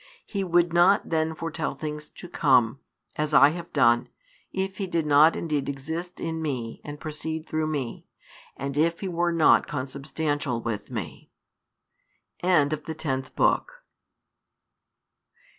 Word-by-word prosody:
He 200 -2 -3
would 175 -1 +2
not 175 +3 +4
then 160 0 0
foretell 160 -1 -3
things 150 -1 -6
to - - -11
come, 130 -6 +3 0.4
as 150 -1 0
I 140 - +8
have 170 +2 -7
done, 120 -4 +3 0.4
if 190 0 -3
He 195 - -2
did 165 -3 -1
not 150 +2 +6
indeed 150 -4 -2
exist 160 +6 -5
in 160 -1 -3
Me 125 -7 -4
and 145 0 -8
proceed 160 +1 -5
through 155 0 -1
Me, 140 -6 -4 0.5
and 140 +1 -4
if 165 +2 +1
He 195 - -2
were 175 -1 0
not 165 -2 +4
Consubstantial 140 -1 -3
with 115 -3 -4
Me." 105 -12 -6 1.1
[End 155 -5 +3
of 155 -1 -5
the 160 - -5
tenth 135 -4 -3
book. - - +1
155 Hz, 140 wpm, -26 LUFS, 140-170 Hz, 1.1 s, I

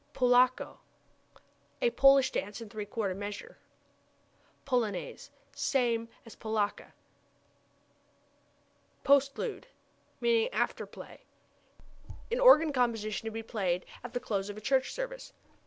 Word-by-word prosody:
Polacca 250 0 +3 1.0
a 485 -1 +2
Polish 275 - +5
dance 205 +3 -3
in 230 -2 -9
three 210 -1 -5
quarter 205 -3 -2
measure. 205 +2 -7 1.1
Polonaise 230 -8 -2 0.2
same 235 -4 0 0.2
as 230 - -12
polacca. 220 -2 -3 2.1
Postlude 280 - +2 0.5
(lit. 470 0 +2
after - - -1
play) - - -12 1.1
an 480 - 0
organ 325 -12 +7
composition 225 -4 -1
to - - -3
be 225 +1 -5
played 185 -6 -2 0.2
at 245 - -8
the 245 - -1
close 200 -4 -3
of 205 - -7
a - - -8
church 265 +3 +1
service. - - -6
240 Hz, 110 wpm, -30 LUFS, 215-275 Hz, 2.1 s, organ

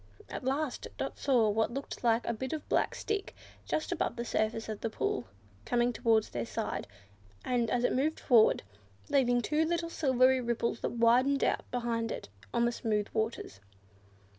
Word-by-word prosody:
At - - -5
last 270 +2 -1
Dot - - -4
saw 245 -6 +3
what 220 +3 0
looked 275 -1 -6
like 230 0 +3
a 235 - 0
bit 260 +5 -4
of 310 - -5
black - - +1
stick, 410 -2 -3 0.3
just 310 - -1
above 350 - -1
the 235 - -4
surface 220 0 -1
of 215 -2 -5
the 225 - -1
pool, 125 - -2 0.4
coming 240 - +1
towards 225 -2 +2
their 115 -1 -3
side, 105 -2 -3 0.6
and, 240 -2 +1
as 245 +1 +1
it - - +2
moved 295 +5 0
forward, 235 -5 +5 0.5
leaving 245 -3 +3
two 305 +5 +2
little 335 +1 -1
silvery 260 -3 +3
ripples 235 -1 -1
that - - -3
widened 245 +4 +4
out - - 0
behind 235 -2 -1
it - - -6 0.2
on 235 0 +2
the 240 - +2
smooth 210 -3 -1
waters. 220 - -2
240 Hz, 175 wpm, -31 LUFS, 225-265 Hz, 0.6 s, forward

